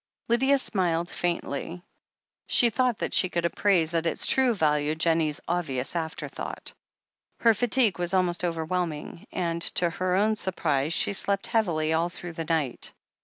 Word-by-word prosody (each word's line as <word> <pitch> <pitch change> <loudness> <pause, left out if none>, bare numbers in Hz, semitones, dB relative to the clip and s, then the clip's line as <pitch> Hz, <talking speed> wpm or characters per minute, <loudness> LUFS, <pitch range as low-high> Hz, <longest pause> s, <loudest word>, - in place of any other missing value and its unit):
Lydia 265 +4 +3
smiled 175 -8 -1
faintly. 175 0 -3 0.6
She 240 -1 +4
thought 250 0 +1
that - - -3
she 185 - +3
could 170 -1 -1
appraise 170 -2 +2
at 165 0 0
its - - 0
true 265 -2 +3
value 150 -3 +1
Jennie's 160 -2 +1
obvious 155 -6 -1
afterthought. 160 -1 -4 0.7
Her 230 -1 +6
fatigue 230 -4 +2
was 175 0 0
almost 180 -2 +1
overwhelming, 165 -1 -3
and, 170 -1 -2
to 175 0 +2
her 185 +1 -1
own 215 +3 +2
surprise, 160 -7 0
she 200 - +3
slept 200 0 +1
heavily 165 -9 +1
all 165 +2 +1
through 175 -1 -7
the 165 0 -5
night. 155 -6 -2
175 Hz, 150 wpm, -26 LUFS, 160-195 Hz, 0.7 s, Her